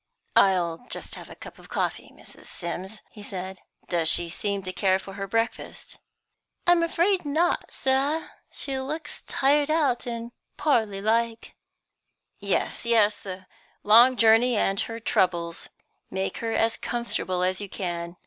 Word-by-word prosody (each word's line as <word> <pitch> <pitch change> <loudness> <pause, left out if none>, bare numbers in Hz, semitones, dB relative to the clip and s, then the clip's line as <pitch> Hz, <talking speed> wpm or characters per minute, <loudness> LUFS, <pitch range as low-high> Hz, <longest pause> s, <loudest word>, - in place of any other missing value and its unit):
"I'll 175 -4 +4
just - - -5
have - - -8
a - - -10
cup - - -12
of - - -15
coffee, - - -2
Mrs. - - -13
Sims," 190 +4 -6
he 210 - -12
said. 190 -1 -6 0.3
"Does 170 -3 +1
she 170 0 +1
seem 200 +2 -2
to 185 0 -5
care 190 -1 +2
for 195 0 -10
her 195 0 -5
breakfast?" 225 +3 -3 0.7
"I'm 350 -1 +5
afraid 350 +3 +2
not, 315 +4 0
sir; 275 +4 0 0.2
she 270 -2 -2
looks 300 +5 -5
tired 290 +2 +2
out, 285 -7 +1
and 235 0 -5 0.3
poorly 220 -9 +1
like." 230 +1 0 0.9
"Yes, - - 0
yes; 220 -3 +3
the 185 -1 -8 0.4
long 240 +5 +7
journey 230 +1 +5
and 195 -1 +2
her 230 0 -2
troubles. 175 -6 0 0.4
Make 190 0 -3
her 230 -1 -3
as 225 0 +1
comfortable 190 -6 -2
as 185 +2 +1
you 200 - -6
can. 175 -2 -4
220 Hz, 150 wpm, -26 LUFS, 190-255 Hz, 0.9 s, long